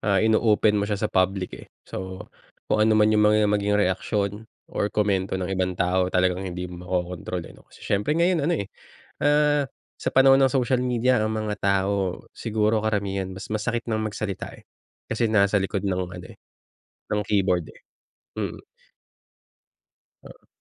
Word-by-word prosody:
ah, 100 -2 +1
ino-open 110 -1 +3
mo 100 - -2
siya 105 - 0
sa 105 +2 -2
public 95 0 +1
eh. - - -10 0.2
So 95 0 -7 0.4
kung 110 - +1
ano 110 0 +4
man 105 0 +4
yung 105 - +3
mga 105 0 +4
maging 105 0 +1
reaksyon 105 +2 -1 0.2
or 100 - 0
komento 100 -3 0
ng 95 0 -3
ibang 95 -1 -1
tao 90 +1 +1
talagang 90 0 +1
hindi 90 0 -5
mo 90 -1 -8
makokontrol 90 -1 -3
eh - - -11
no, - - -20
kasi - - -16
siyempre 105 +10 0
ngayon 170 -1 +3
ano - - +2
eh, 100 - -3 0.6
ah, 145 0 +3 0.3
sa - - -3
panahon 135 0 +6
ng 130 - +3
social 130 -1 +1
media 125 -2 +2
ang 110 - -1
mga 105 -1 -2
tao, 100 -1 0
siguro 110 -1 0
karamihan 100 -3 -1
mas 95 +2 -8
masakit 115 +2 -2
ng 110 -1 -1
magsalita 100 -2 -4
eh. - - -24 0.4
Kasi 115 0 0
nasa 100 -1 +3
likod 100 0 0
ng 95 -1 0 0.2
ano - - -10
eh, - - -14 0.7
ng 105 0 0
keyboard 95 -5 +1
eh, - - -20 0.5
mm. - - -5 1.6
Oo. - - -15
105 Hz, 170 wpm, -24 LUFS, 95-110 Hz, 1.6 s, panahon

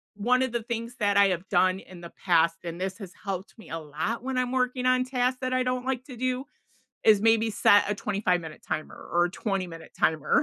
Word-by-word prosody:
1 250 +5 +2
of 260 - -2
the 235 -1 -1
things 235 +1 -5
that 205 -1 +2
I 200 -1 +7
have 185 0 -3
done 185 0 +3
in 180 -3 -13
the 170 - -9
past, 165 -2 +3
and 170 0 -6
this 190 +3 -3
has 185 -3 -9
helped 195 +2 -5
me 220 - -13
a 165 - -3
lot 155 +10 -3
when 265 -1 -2
I'm 250 0 0
working 250 0 0
on 255 0 +3
tasks 255 0 0
that 255 0 -1
I 255 0 +2
don't 250 0 -1
like 260 -1 -1
to 255 -3 -10
do, 255 +2 -1 0.6
is 210 -2 +6
maybe 225 0 +4
set 205 -1 +4
a - - +1
25 195 -4 0
minute 160 -1 -10
timer, 155 - -5
or 175 +1 +3
a 175 - -1
20 195 -2 -2
minute 165 -1 -11
timer, 155 -2 +2
210 Hz, 235 wpm, -27 LUFS, 180-250 Hz, 0.6 s, I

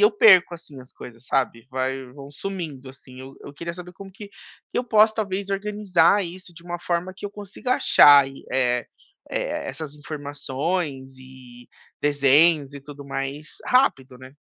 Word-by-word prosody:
eu 210 - +8
perco, 190 -5 +6
assim, 160 -5 -10
as 125 - -13
coisas, 120 +1 -12
sabe. 125 -3 -1
Vai 130 +1 -3
vão 140 +1 -11
sumindo, 150 -5 -6
assim, 130 -1 -13
eu 135 +1 -11
eu 140 - -10
queria 170 +3 -6
saber 180 0 -10
como 195 +2 -12
que 205 0 -11
que - - -10
eu 250 - -1
posso, 220 -2 +4
talvez, 200 -2 -3
organizar 200 -2 +2
isso 175 0 -10
de 165 - -14
uma 175 0 -6
forma 175 +1 -2
que 205 - -6
eu - - -8
consiga 205 +5 -3
achar 140 -2 +7
e, 135 - -13
eh 125 -2 0 0.4
eh, - - -3
essas 155 -3 -6
informações 145 -1 -4
e 130 -2 -15 0.3
desenhos, 145 +1 +3
e 140 - -8
tudo 145 0 -11
mais 140 +2 -5
rápido, 135 - +2
né. 130 +1 -13
150 Hz, 170 wpm, -23 LUFS, 135-185 Hz, 0.4 s, eu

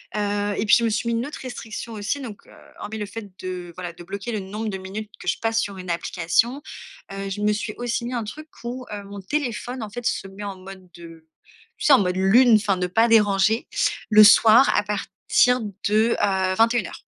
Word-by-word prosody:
heu 205 0 -1
et - - 0
puis, - - +6
je 235 - -1
me - - +2
suis 220 +2 -2
mis 230 - 0
une 245 - -2
autre 295 - -8
restriction 235 -2 -7
aussi 220 +7 -3
donc, 225 -6 -9
heu, - - -18 0.3
hormis 220 +1 -6
le 210 - -3
fait 220 -1 -8
de, 180 -1 -5
voilà, 175 -2 -6
de 170 - -13
bloquer 200 +6 -6
le 215 - -2
nombre 210 +3 -5
de 195 - -4
minutes 200 +3 -7
que - - -11
je - - +1
passe 225 0 0
sur 200 -3 -5
une 180 -1 -8
application, 185 - 0 0.5
heu, 195 0 -5
je 200 +2 -5
me 210 0 +2
suis 210 0 -3
aussi 235 -1 -2
mis 245 - -4
un 240 -2 -2
truc 305 +9 -9 0.2
où, 250 +1 -5
heu, 205 -1 -6
mon 200 0 -9
téléphone, 245 +1 -3
en 215 - -6
fait, 240 +3 -8
se 195 - -1
met 195 +2 -10
en 200 -2 -5
mode 190 0 -12
de 165 -2 -13 0.5
tu - - -5
sais, 295 - +7
en 265 - +7
mode 180 -2 0
lune, 225 +6 +5
enfin, 205 -2 +2
ne 180 0 -1
pas 225 +6 +3
déranger, 210 -1 +3 0.4
le 215 -1 +8
soir 225 +4 +7
à - - +2
partir 210 +4 +1 0.3
de, 220 +2 +3
heu, 190 -2 +1
21:00. 230 +3 +1
210 Hz, 225 wpm, -23 LUFS, 195-230 Hz, 0.5 s, le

